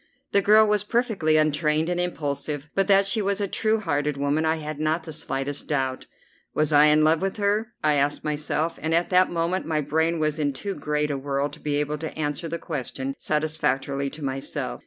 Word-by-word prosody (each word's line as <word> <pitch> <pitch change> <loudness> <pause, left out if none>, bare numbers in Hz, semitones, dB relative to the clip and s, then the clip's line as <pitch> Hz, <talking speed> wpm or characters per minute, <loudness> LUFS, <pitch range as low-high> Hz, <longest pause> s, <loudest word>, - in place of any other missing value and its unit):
The 200 - +4
girl 215 +2 +6
was 210 -1 +2
perfectly 210 -9 +1
untrained 155 +1 +2
and 175 0 -1
impulsive, 150 -3 -3
but 195 -1 +1
that 200 -1 +5
she 215 +3 +1
was 200 0 0
a 200 - 0
true 220 +3 +1
hearted 145 -6 -1
woman 145 +3 0
I 160 - +2
had 155 -1 -6
not 155 +2 0
the 160 -1 -7
slightest 145 -2 -3
doubt. 130 -3 -2 0.5
Was 155 0 +1
I 145 +1 +7
in 150 0 +5
love 160 +2 +3
with 195 +2 -2
her? 210 +3 0
I 150 -1 +4
asked 145 0 0
myself, 150 +2 -2
and 160 +1 +1
at 170 +2 0
that 185 0 +5
moment 170 +2 -1
my 155 -2 0
brain 160 +3 0
was 155 0 0
in 145 -2 0
too 200 +8 -4
great 150 -1 -1
a 140 - -2
whirl 140 +1 -1
to - - -13
be 145 -1 -2
able 150 +1 -1
to 160 0 -6
answer 150 +1 -2
the 170 - -3
question 135 -4 -4
satisfactorily 140 -3 -1
to 150 +2 -10
myself. 135 0 -3
155 Hz, 210 wpm, -25 LUFS, 145-175 Hz, 0.5 s, I